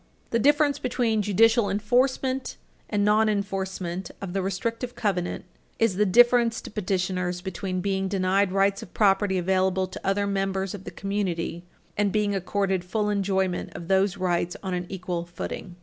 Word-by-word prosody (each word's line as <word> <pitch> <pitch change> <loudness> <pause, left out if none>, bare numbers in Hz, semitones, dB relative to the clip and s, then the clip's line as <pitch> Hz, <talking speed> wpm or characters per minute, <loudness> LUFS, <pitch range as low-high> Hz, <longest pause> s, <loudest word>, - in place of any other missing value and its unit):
The 235 - +2
difference 290 +2 +3
between 235 -3 0
judicial 220 +2 +3
enforcement 255 +5 0 0.3
and 205 -1 +1
nonenforcement 195 -4 0
of 190 -3 -6
the 195 - 0
restrictive 230 +6 -3
covenants 190 -8 -2 0.3
is 225 -4 +2
the 210 +2 +2
difference 240 +2 +5
to - - -9
petitioners 180 -3 -1
between 185 0 -3
being 195 0 0
denied 190 0 +1
rights 195 +1 +2
of - - -12
property 195 -2 +3
available 190 +1 +1
to 185 - -9
other 200 +1 +1
members 195 -1 -1
of 195 -2 -8
the - - -5
community 180 -4 -3 0.3
and 205 -1 +1
being 210 -1 +1
accorded 195 -1 -1
full 210 +3 -1
enjoyment 190 -2 -1
of 170 +1 -8
those 190 0 +2
rights 175 -1 -1
on 190 -1 -3
an 180 0 -3
equal 180 -2 -3
footing. 175 +1 -7
195 Hz, 155 wpm, -26 LUFS, 185-210 Hz, 0.3 s, difference